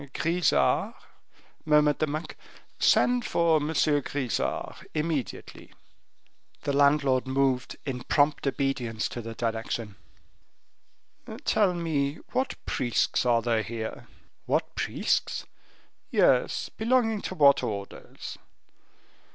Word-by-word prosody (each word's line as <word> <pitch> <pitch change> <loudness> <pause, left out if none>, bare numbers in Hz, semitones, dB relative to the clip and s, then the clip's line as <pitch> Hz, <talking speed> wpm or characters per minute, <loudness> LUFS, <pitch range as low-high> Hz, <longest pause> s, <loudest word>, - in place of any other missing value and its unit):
Grisart?" 170 +1 +1 0.7
murmured 150 -1 +3
the 155 - +1
monk, 155 +3 -5 0.4
"send 245 0 +4
for 165 -5 +2
M. 150 -1 -2
Grisart 145 -5 -1
immediately." 150 -3 -4 0.9
The 140 - -1
landlord 140 -2 +3
moved 130 -1 0
in 125 -3 -4
prompt 145 -1 +2
obedience 130 -5 -1
to 120 - -6
the 115 0 -7
direction. 110 -2 -3 1.5
"Tell 195 -4 +3
me 150 -4 -1 0.2
what 260 +1 -1
priests 120 0 0
are 115 -2 +3
there 115 -1 +1
here?" 110 0 -6 0.4
"What - - 0
priests?" - - -1 0.6
"Yes; - - +2
belonging 225 -2 +1
to 185 - -5
what 140 -3 +6
orders?" 100 -2 -6
140 Hz, 100 wpm, -27 LUFS, 120-160 Hz, 1.5 s, what